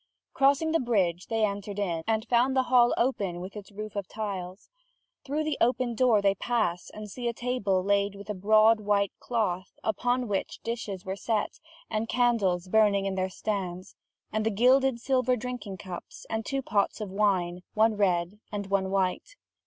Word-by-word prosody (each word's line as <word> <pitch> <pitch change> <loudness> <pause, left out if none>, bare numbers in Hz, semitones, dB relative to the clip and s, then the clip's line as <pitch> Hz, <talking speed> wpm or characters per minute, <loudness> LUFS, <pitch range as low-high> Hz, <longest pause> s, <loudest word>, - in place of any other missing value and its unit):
Crossing 280 +4 +3
the 330 - +3
bridge, 190 -8 0
they 225 -1 +2
entered 200 0 -4
in, 175 -5 -1
and 220 +1 0
found 250 +3 +3
the 260 - +4
hall 240 -1 +6
open 200 -8 0
with 185 +3 -8
its 210 0 -9
roof 215 +1 -7
of 200 -3 -3
tiles. 195 -3 -5 0.6
Through 295 +3 -1
the 305 -1 -2
open 245 0 +2
door 230 -3 +3
they 195 -1 +4
pass, 200 -4 -1
and 215 0 -8
see 240 +4 -5
a 235 - 0
table 220 -6 0
laid 200 0 +1
with 200 0 -10
a 210 - -2
broad 215 +3 +5
white 200 -2 +1
cloth, 200 -6 -2
upon 245 +3 0
which 200 -2 -2
the 230 - -4
dishes 205 -5 -5
were 190 0 -3
set, 215 +1 -2 0.3
and 215 +1 -1
the - - -6
candles 205 -8 +2
burning 205 -1 +3
in 195 - -1
their 190 0 -1
stands, 185 -3 -4 0.4
and 215 0 0
the 220 - +2
gilded 255 +3 +3
silver 255 0 +2
drinking 245 -5 -5
cups, 185 -2 -9
and 220 -1 -2
two 275 -1 -1
pots 205 -3 0
of 210 -3 -5
wine, 185 -3 +1
one 220 0 +4
red 185 -1 +1
and 200 -2 -5
one 190 -1 +1
white. 195 - -1
210 Hz, 185 wpm, -28 LUFS, 195-240 Hz, 0.6 s, hall